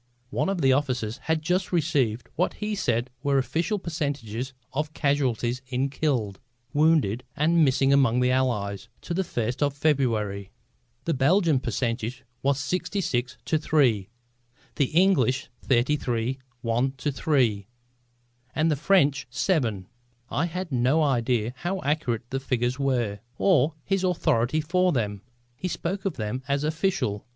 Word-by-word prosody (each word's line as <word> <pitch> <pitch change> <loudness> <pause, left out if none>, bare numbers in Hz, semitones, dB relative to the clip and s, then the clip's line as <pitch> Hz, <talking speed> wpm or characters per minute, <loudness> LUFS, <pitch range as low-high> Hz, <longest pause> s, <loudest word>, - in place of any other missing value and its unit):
One 190 - 0
of 195 -3 -1
the 135 -2 +5
officers 125 -4 -1
had 160 0 0
just 180 +3 0
received 140 -9 +1
what 180 - 0
he 210 0 -3
said 120 - 0
were 140 -1 +2
official 160 - 0
percentages 140 - -3 0.2
of 150 +2 -2
casualties 130 -4 0
in 130 +2 -1
killed, 125 -10 -1 0.3
wounded 145 -7 +3
and 165 +2 +3
missing 135 0 +3
among 130 -4 +4
the 125 0 +3
Allies, 110 -7 -1
to 170 - -4
the 190 +3 +1
first 120 -6 -3
of 145 -1 +1
February. 115 -10 0 0.6
The 165 - +1
Belgian 155 +2 +3
percentage 120 0 -2 0.2
was 140 0 +1
66 145 -5 -1
2 160 - +2
3, 125 -11 +2 0.7
the 140 - +4
English 135 - +2
33 125 -1 0 0.2
1 120 +4 +1
3 130 -7 0 0.9
and 160 +1 +2
the - - +2
French 145 -4 +2
7. 120 - 0 0.5
I 165 +4 +1
have 180 0 -5
no 130 +5 +3
idea 120 -4 +1
how 190 +5 -2
accurate 130 -6 -1
the 135 - -1
figures 125 -1 -1
were, 120 -7 0 0.2
or 155 -5 +3
his 195 -1 0
authority 155 -6 +1
for 180 +4 +2
them. 105 - -1 0.3
He 165 +9 -4
spoke 185 +3 -3
of 195 - -1
them 110 +4 -3
as 140 +1 0
official. 155 - -1
135 Hz, 140 wpm, -26 LUFS, 120-160 Hz, 0.9 s, the